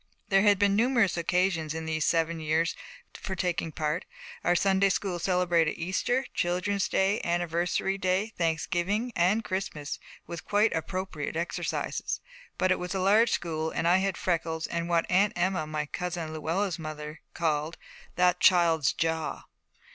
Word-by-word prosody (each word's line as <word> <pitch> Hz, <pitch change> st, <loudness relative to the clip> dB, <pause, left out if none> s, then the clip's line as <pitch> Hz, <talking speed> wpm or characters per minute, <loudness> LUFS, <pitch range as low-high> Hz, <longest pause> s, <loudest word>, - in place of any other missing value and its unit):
There 195 Hz, -1 st, +5 dB
had 205 Hz, -1 st, +5 dB
been 200 Hz, 0 st, +3 dB
numerous 230 Hz, -4 st, +3 dB
occasions 170 Hz, -2 st, 0 dB
in 160 Hz, 0 st, -4 dB
these 160 Hz, -1 st, -1 dB
seven 165 Hz, 0 st, +1 dB
years 160 Hz, +2 st, 0 dB, 0.4 s
for 190 Hz, -, -5 dB
taking 175 Hz, -3 st, -1 dB
part: 155 Hz, +1 st, -2 dB, 0.4 s
our 175 Hz, -, +3 dB
Sunday 195 Hz, +2 st, +3 dB
school 185 Hz, -2 st, -1 dB
celebrated 175 Hz, -3 st, +2 dB
Easter, 200 Hz, +9 st, 0 dB
Children's 185 Hz, +3 st, 0 dB
Day, 195 Hz, +3 st, +2 dB
Anniversary 175 Hz, +3 st, 0 dB
Day, 190 Hz, +4 st, 0 dB
Thanksgiving, 175 Hz, +7 st, 0 dB
and 190 Hz, +6 st, +2 dB
Christmas, 185 Hz, -7 st, -4 dB, 0.3 s
with 170 Hz, -1 st, -7 dB
quite 210 Hz, +2 st, +2 dB
appropriate 165 Hz, -2 st, -4 dB
exercises. 170 Hz, +2 st, -2 dB, 0.4 s
But 185 Hz, 0 st, +2 dB
it 185 Hz, -, +2 dB
was 180 Hz, +2 st, -4 dB
a -, -, 0 dB
large 210 Hz, +5 st, +4 dB
school, 160 Hz, -4 st, -1 dB
and 165 Hz, -, -1 dB
I 175 Hz, +2 st, +5 dB
had 195 Hz, 0 st, 0 dB
freckles 165 Hz, -2 st, -1 dB
and 170 Hz, 0 st, -3 dB
what 170 Hz, -1 st, +2 dB
Aunt 200 Hz, +3 st, +3 dB
Emma, 175 Hz, -3 st, 0 dB
my 155 Hz, -1 st, -2 dB
cousin 170 Hz, 0 st, -4 dB
Luella's 165 Hz, +4 st, -1 dB
mother, 155 Hz, -1 st, -7 dB, 0.2 s
called 155 Hz, -1 st, -1 dB, 0.4 s
'that 180 Hz, 0 st, +3 dB
child's 165 Hz, -6 st, +4 dB
jaw.' 160 Hz, -1 st, -2 dB
175 Hz, 150 wpm, -28 LUFS, 160-190 Hz, 0.4 s, There